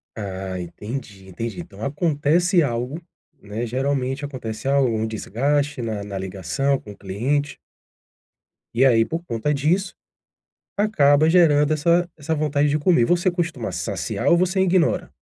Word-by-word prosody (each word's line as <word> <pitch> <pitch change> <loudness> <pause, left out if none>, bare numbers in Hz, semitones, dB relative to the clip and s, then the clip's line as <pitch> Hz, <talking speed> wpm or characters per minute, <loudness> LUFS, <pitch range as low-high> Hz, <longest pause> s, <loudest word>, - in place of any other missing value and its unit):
Ah, 95 -3 -5
entendi, 100 +2 -7
entendi. 115 - -5
Então 175 - -13
acontece 165 +4 +2
algo, 125 +4 -2 0.4
né, 105 +3 -4
geralmente 135 +2 -1
acontece 130 -3 -6
algo, 140 -2 +3
um 110 -1 -1
desgaste 140 +6 -1
na 110 -3 -3
na 100 -1 -6
ligação 95 - -1
com 105 - -11
o 100 - -13
cliente. 135 +10 -2 1.2
E 130 +3 +4
aí, 115 -3 +5
por 165 +1 -4
conta 120 +2 -1
disso, 175 +7 0 0.8
acaba 155 -7 +4
gerando 155 -4 +4
essa 170 +3 +2
essa 155 +2 -2
vontade 150 -1 +1
de 145 - +2
comer. 150 -5 +3
Você 175 +3 +2
costuma 165 - -3
saciar 90 -2 -3
ou 170 - +6
você 185 +2 +1
ignora? 180 -1 +2
140 Hz, 140 wpm, -22 LUFS, 115-160 Hz, 1.2 s, ou